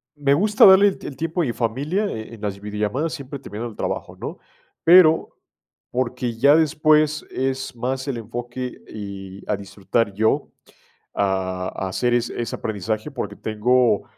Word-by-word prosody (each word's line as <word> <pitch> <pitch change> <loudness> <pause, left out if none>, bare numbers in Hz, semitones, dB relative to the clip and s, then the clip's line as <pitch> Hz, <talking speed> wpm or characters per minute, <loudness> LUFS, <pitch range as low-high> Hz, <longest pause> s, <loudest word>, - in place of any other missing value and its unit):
me 140 -1 +2
gusta 210 - +5
darle 195 +1 +8
el - - -6
el 135 - -6
tiempo 165 +2 -1
a - - +1
mi 120 - -2
familia, 140 - -1
e 110 - -6
en 110 - -11
las 100 -2 -3
videollamadas 105 +9 -2
siempre 140 0 -6
termino 110 +4 -6
el 115 - -10
trabajo, - - -4
¿no? - - -6 0.4
Pero, 165 -2 +6 0.5
porque 125 -1 -2
ya 140 +5 +6
después 155 -1 +3
es 130 0 -2
más 130 +3 -3
el 135 -4 -2
enfoque 120 +3 -6
y 100 -2 -8
a 105 - +2
disfrutar 100 +2 -2
yo, 110 +1 +1 0.6
a 95 -2 -1
a 95 - -3
hacer 120 +5 0
ese 120 0 -1
ese 115 - -3
aprendizaje, 110 +5 -3
porque 105 -6 -5
tengo 110 0 +2
120 Hz, 160 wpm, -22 LUFS, 105-145 Hz, 0.6 s, darle